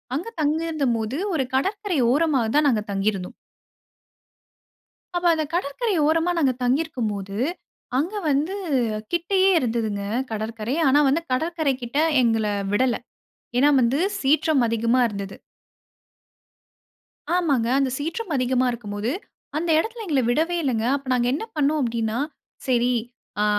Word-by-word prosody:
அங்க 345 +11 -3
தங்கியிருந்தபோது, 290 -7 0 0.2
ஒரு 270 -4 +1
கடற்கரை 390 +3 0
ஓரமா 295 -3 +2
தான் 300 0 +4
நாங்க 220 -5 +1
தங்கியிருந்தோம். 195 -2 -1 1.8
அப்ப, 350 - -2
அந்த 315 -1 -1
கடற்கரை 370 - -1
ஓரமா, 325 +2 +2
நாங்க 275 -5 +3
தங்கி 255 +5 +2
இருக்கும் 245 -9 -3
போது. 195 0 -6 0.6
அங்க 335 +9 -1 0.2
வந்து 295 +7 +1 0.6
கிட்டேயே 375 +3 +3
இருந்துதுங்க, 225 -6 -1 0.3
கடற்கரை. 220 +2 -3
ஆனா, 285 +3 +5
வந்து 305 +5 +1
கடற்கரை 315 +1 0
கிட்ட 240 +4 -3 0.2
எங்கள 225 -2 +2 0.3
விடல. 245 +3 +2 0.6
ஏனா 280 +4 +5
வந்து 245 +5 +2 0.2
சீற்றம் 285 0 +3
அதிகமா 230 +2 +1
இருந்தது. 200 -2 -6 2.0
ஆமாங்க. 285 -10 +1
அந்த 270 -2 +1
சீற்றம் 330 +6 -4
அதிகமா 255 0 +1
இருக்கும்போது, 215 -1 -4 0.5
அந்த 330 +2 -1
எடத்துல 450 +6 -2
எங்கள 290 -5 +2
விடவே 325 +7 +1
இல்லங்க. 235 -5 0
அப்ப 275 -1 -10
நாங்க 240 -1 +1
என்ன 310 - -3
பண்ணோம் 300 +1 +2
அப்பிடின்னா, 230 -1 -1 0.5
சரி 245 0 +3 0.5
அ - - +3
270 Hz, 125 wpm, -23 LUFS, 230-320 Hz, 2.0 s, ஆனா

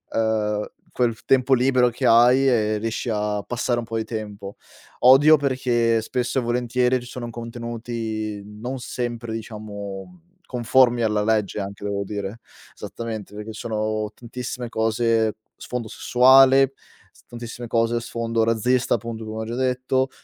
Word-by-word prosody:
ehm, 105 -2 0 0.2
quel 120 -3 -1
tempo 135 0 +3
libero 125 -1 +3
che 120 - -1
hai, 125 +4 +6
ehm, 110 -3 +1
riesci 115 +2 -3
a 105 -1 -1
passare 120 0 -1
un 120 - -3
po' 115 0 -4
di 110 - -1
tempo. 105 -3 -7 0.4
Odio 145 +5 +7
perché 120 -4 +1
spesso 125 +3 -1
e - - -1
volentieri 125 +1 +1
ci - - -11
sono 120 -2 -6
contenuti 115 -2 -5
non 115 +6 -6
sempre 120 -2 -4
diciamo 105 - -7 0.3
conformi 120 0 +3
alla 105 -2 +1
legge 105 -2 0
anche 100 +1 -7
devo 100 0 -2
dire 100 +2 -5 0.3
esattamente, 110 -3 -7
perché 105 +1 -7
sono 110 -1 -2
tantissime 125 +1 -6
cose 110 -1 +1 0.2
sfondo 125 -3 -5
sessuale, 135 +3 +5 0.4
s - - -24
tantissime 120 0 -8
cose 115 0 +1
a - - +1
sfondo 115 -1 -1
razzista 120 +3 +2
appunto 115 0 -6
come 110 0 -5
ho - - -6
già 115 +2 -5
detto, 130 +1 0
115 Hz, 145 wpm, -23 LUFS, 110-125 Hz, 0.4 s, Odio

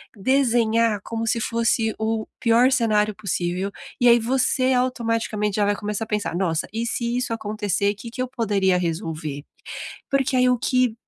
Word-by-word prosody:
desenhar 230 -2 +2
como 225 +2 -4
se 230 - +1
fosse 230 0 +1
o 220 0 -1
pior 240 +2 +4
cenário 215 -4 +2
possível, 190 -1 -2 0.3
e 245 - +4
aí, 235 0 +7
você, 255 +2 +1
automaticamente, 230 -4 0
já 210 - +2
vai 205 0 +1
começar 210 +1 -3
a - - -23
pensar: 210 -5 -2
"Nossa, 170 -4 0
e 225 +2 -2
se 235 +1 -1
isso 250 -2 -1
acontecer, 210 -2 -1
que 230 +3 -9
que 255 - -5
eu 255 - -1
poderia 205 -7 +1
resolver?", 160 -4 -3 0.7
porque, 270 -1 +1
aí, 250 0 +4
o 250 - +2
que 255 -3 +1
225 Hz, 170 wpm, -23 LUFS, 205-240 Hz, 0.7 s, aí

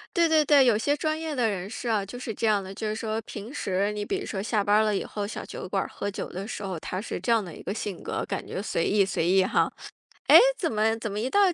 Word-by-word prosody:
对 340 -2 +4
对 310 -1 +4
对， 285 -2 +6
有 235 -4 +4
些 285 +7 +1
专 310 +1 -1
业 320 -2 -3
的 240 -4 +2
人 195 -2 -4
士 240 +2 -4
啊， 210 -3 +1
就 225 +5 -8
是 245 -2 -5
这 225 - -1
样 205 -2 +2
的。 190 +1 -8
就 215 +2 -4
是 215 - -1
说 220 0 -2
平 215 +4 -8
时 195 -4 0
你 210 0 -4
比 390 - -1
如 390 - -6
说 190 - -3
下 210 0 0
班 205 - +2
儿 - - +5
了 215 -1 +1
以 - - -1
后， 205 -1 -4
小 215 - -6
酒 - - -7
馆 195 +1 0
儿 - - -8
喝 205 - -3
酒 200 - -5
的 195 +3 -6
时 215 - -5
候， 190 -4 -4
他 185 +4 -4
是 225 - -4
这 - - -5
样 225 -2 +2
的 175 -4 -8
一 - - -11
个 195 - -3
性 205 -4 -5
格， - - -3
感 - - -4
觉 - - -4
随 170 -5 -1
意 205 -1 +3
随 170 -3 -1
意 190 +1 +5
哈。 - - +2 0.6
诶， - - +11 0.2
怎 335 - -1
么 220 +1 +2
怎 225 - -3
么 200 - -4
一 230 +4 -1
到 405 - +3
215 Hz, 330 characters per minute, -26 LUFS, 195-240 Hz, 0.6 s, 诶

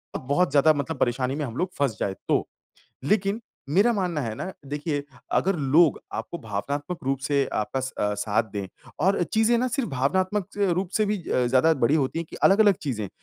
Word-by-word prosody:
अ, - - +1
बहुत 145 +6 +1
ज़्यादा 150 +2 +5
मतलब 145 +1 -3
परेशानी 125 +1 0
में 150 0 -2
हम 115 -3 -7
लोग 185 - 0
फँस 135 -6 0
जाएँ 95 - -1
तो। - - +1 0.6
लेकिन, 200 +6 +1 0.3
मेरा 200 +10 +4
मानना 180 -7 -1
है 115 -5 -3
ना 185 +11 -5
देखिए 145 +1 -2 0.4
अगर 195 0 +1 0.2
लोग 165 0 +5 0.2
आपको 170 - -8
भावनात्मक 140 - -4
रूप 135 0 0
से 140 -1 +2
आपका 110 +5 -1 0.3
अ, - - -1
साथ 105 +2 +1
दें, 100 -2 -3 0.3
और 195 -1 +3
चीज़ें 220 +2 +3
ना 255 +2 +1
सिर्फ 250 +1 -1
भावनात्मक 185 +9 0
अ, 200 -2 +2
रूप 185 +2 -1
से 215 - +2
भी 210 0 0
अ, 125 - +2
ज़्यादा 135 +6 +4
बड़ी 140 - +4
होती 150 +1 0
है 165 - -2
कि - - -8
अलग-अलग 200 0 +6
चीज़ें, 110 -8 -3
150 Hz, 200 wpm, -25 LUFS, 130-190 Hz, 0.6 s, अलग-अलग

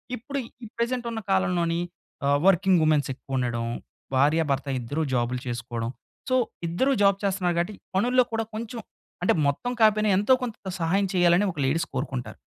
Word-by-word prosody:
ఇప్పుడు 280 +4 -5 0.2
ఈ - - -5
ప్రెజెంట్ 240 +1 -1
ఉన్న 225 - -3
కాలంలోని 175 -3 +1 0.5
ఆహ్, 140 0 +4
వర్కింగ్ 190 -1 +4
వుమెన్స్ 155 -3 +3
ఎక్కువ 135 +1 -7
ఉండడం, 120 -2 -1 0.5
భార్య 150 +5 +4
భర్త 140 +1 -1
ఇద్దరూ 145 +6 -3
జాబులు 125 0 0
చేసుకోవడం. 120 -1 -3 0.4
సో 255 - +3 0.3
ఇద్దరూ 180 +12 +1
జాబ్ 200 -1 +5
చేస్తున్నారు 185 -3 0
కాబట్టి 175 +5 0 0.2
పనుల్లో 250 +6 +4
కూడా 225 0 0
కొంచెం 230 +2 -5 0.4
అంటే - - +4
మొత్తం 140 - -1
కాపోయినా, 215 -1 +4
ఎంతో 205 +6 +4
కొంత 235 -3 -3 0.2
సహాయం 180 +4 +2
చేయాలని 175 +2 +4
ఒక 165 - -16
లేడీస్ 160 +5 +1
కోరుకుంటారు. 130 -2 -4
175 Hz, 160 wpm, -26 LUFS, 140-215 Hz, 0.5 s, జాబ్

